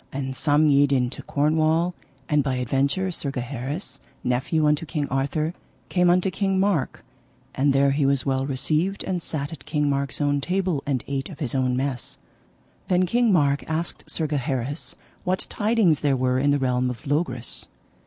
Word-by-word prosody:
And 135 -1 -4
some 150 +2 +3
yede 145 -1 +4
into 125 -2 0
Cornwall; 160 +4 +1 0.3
and 150 -1 +2
by 130 -1 -1
adventure 140 +9 0
Sir 150 -4 -3
Gaheris, 135 +5 -5 0.2
nephew 130 +6 +1
unto 150 +1 +2
King 150 -3 -2
Arthur, 145 +5 -1 0.4
came 180 -1 +3
unto 180 +2 +3
King 195 +1 0
Mark, 190 -9 0 0.5
and 140 +2 +2
there 135 0 +4
he 140 +1 +1
was 140 -2 +1
well 135 0 0
received 155 +8 0
and 180 -2 -2
sat 150 -1 -3
at 155 - -10
King 150 -1 +1
Mark's 140 0 -2
own 145 -1 +1
table 180 -3 0
and 135 -4 0
ate 135 -1 -3
of 165 - -9
his 140 -8 -3
own 130 -2 +1
mess. 130 -2 -3 0.7
Then 180 0 +3
King 235 +4 +2
Mark 145 -5 +3
asked 160 +2 -3
Sir 160 - -2
Gaheris 140 -1 -2 0.3
what 185 +1 +1
tidings 210 -7 +2
there 140 -2 +1
were 130 0 +1
in 140 +2 +2
the 145 - +4
realm 125 -2 +1
of 125 +4 -7
Logris. 140 -5 -1
145 Hz, 175 wpm, -24 LUFS, 135-165 Hz, 0.7 s, yede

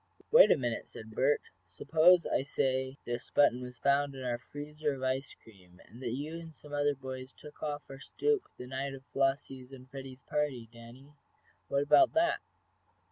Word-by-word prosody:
"Wait - - +9
a - - +5
minute," 120 -4 -3
said 110 0 -10
Bert. 135 +6 +2 0.3
"Suppose 165 - +4
I - - +1
say 130 -1 -1
that - - -5
this 120 0 -4
button 125 -3 +4
was 125 0 -8
found 140 0 +2
in 130 - -7
our 120 -1 -1
freezer 150 +2 -4
of 130 - -8
ice 130 +1 -1
cream, 90 -5 -19
that 120 -1 -4
you 155 +4 -5
and 165 -2 -11
some 150 -1 -13
other 145 0 +2
boys 130 0 -8
took 150 0 -13
off 145 -1 -3
our 135 0 -10
stoop 435 - 0
the 125 - -7
night 135 +2 -4
of 135 0 -13
Flossie's 135 -1 -1
and 130 -1 -12
Freddie's 135 -2 -9
party, 140 -6 -2
Danny? 120 +5 -14 0.5
What 140 0 +1
about 325 - +5
that?" 335 +1 +2
135 Hz, 185 wpm, -32 LUFS, 130-145 Hz, 0.5 s, Wait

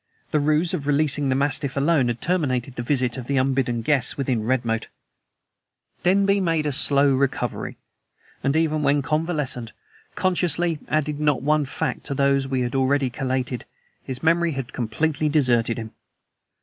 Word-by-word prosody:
The 150 - +2
ruse 155 +4 +1
of 145 -6 -3
releasing 145 -1 +2
the 130 - +2
mastiff 140 0 0
alone 140 -2 +3
had 120 -1 -3
terminated 135 -8 0
the 120 - -5
visit 125 0 0
of 125 -2 -7
the 140 - 0
unbidden 130 -3 0
guest 135 -1 +1
within 130 -5 0
Redmoat. 115 -2 -1 1.1
Denby 195 +2 +3
made 165 -4 0
a - - +1
very - - -4
slow 140 +1 +3
recovery; 135 0 -2 0.7
and, 135 +2 +1
even 155 -1 +1
when 145 0 +2
convalescent, 150 -7 -1 0.4
consciously 175 -3 +1
added 150 -1 -1
not 150 -3 +1
one 150 0 +2
fact 135 - -3
to 140 - -3
those 140 0 +2
we 130 -2 0
already 135 +2 +1
had 125 - -4
collated; 130 -1 -2 0.4
his 130 +1 -6
memory 170 0 +2
had 135 -2 -5
completely 150 +5 -1
deserted 120 -6 +2
him! 110 -1 -6
140 Hz, 160 wpm, -23 LUFS, 130-155 Hz, 1.1 s, alone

